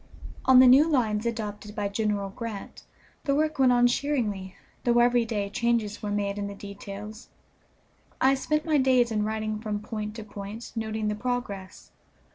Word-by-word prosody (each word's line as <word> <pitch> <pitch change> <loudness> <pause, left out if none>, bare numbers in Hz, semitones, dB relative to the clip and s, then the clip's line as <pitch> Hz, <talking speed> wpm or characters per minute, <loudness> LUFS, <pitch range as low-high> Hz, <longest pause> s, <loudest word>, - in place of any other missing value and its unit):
On 260 -1 +7
the 260 - +9
new 270 +6 +7
lines 225 -6 +1
adopted 210 -2 -5
by 205 -2 -1
General 200 -1 -1
Grant, 225 -1 -7 0.4
the 275 -2 +2
work 310 0 0
went 260 -2 +5
on 245 0 +4
cheeringly, 230 -8 -1 0.3
though 240 -1 +3
every 240 0 +4
day 210 -3 -2
changes 220 0 -1
were 210 - -3
made 205 0 -1
in 200 - -2
the 200 - -7
details. 200 +2 -9 0.9
I 265 +1 +5
spent 305 +3 -1
my 310 -3 +3
days 255 -3 +3
in 210 -1 0
riding 215 0 -2
from 215 -2 -3
point 210 0 -5
to 225 - -6
point, 210 +2 -8
noting 220 -1 -2
the 210 - 0
progress. 210 -4 -4
220 Hz, 170 wpm, -27 LUFS, 205-245 Hz, 0.9 s, the